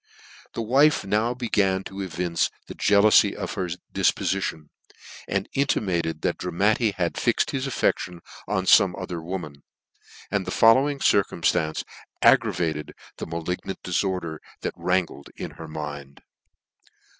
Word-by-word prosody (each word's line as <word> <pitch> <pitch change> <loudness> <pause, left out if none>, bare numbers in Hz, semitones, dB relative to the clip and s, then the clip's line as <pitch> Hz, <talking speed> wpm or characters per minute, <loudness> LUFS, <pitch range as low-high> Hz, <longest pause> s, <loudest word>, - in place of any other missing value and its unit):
The 115 - -2
wife 140 +5 +3
now 110 +5 +1
began 100 -6 +1
to 95 +1 -7
evince 90 -2 -1 0.2
the - - -8
jealcufy 105 0 +4
of - - -4
her 95 -3 -2 0.3
ditpofition; 80 -6 0 0.6
and - - -1
intimated 85 - 0
that 90 - -1
Dramatti 100 +6 +1
had 90 -2 -2
fixed - - +1
his 135 0 -2
affe6tions 90 -8 -1 0.3
on 95 -2 0
fome 95 -2 +5
other 90 -3 -5
woman: 80 -5 -6 0.7
and - - -1
the - - -2
following 135 +6 +4
circumftance 85 -8 +1 0.4
aggravated 80 -3 +2 0.2
the - - -6
malig 85 +2 -4
nant 95 - -5
diforder 90 -3 -2 0.2
that - - -3
wrankled 90 -6 -1
in - - -6
her 80 - -10
mind. 70 -3 -7
95 Hz, 130 wpm, -25 LUFS, 85-105 Hz, 0.7 s, fome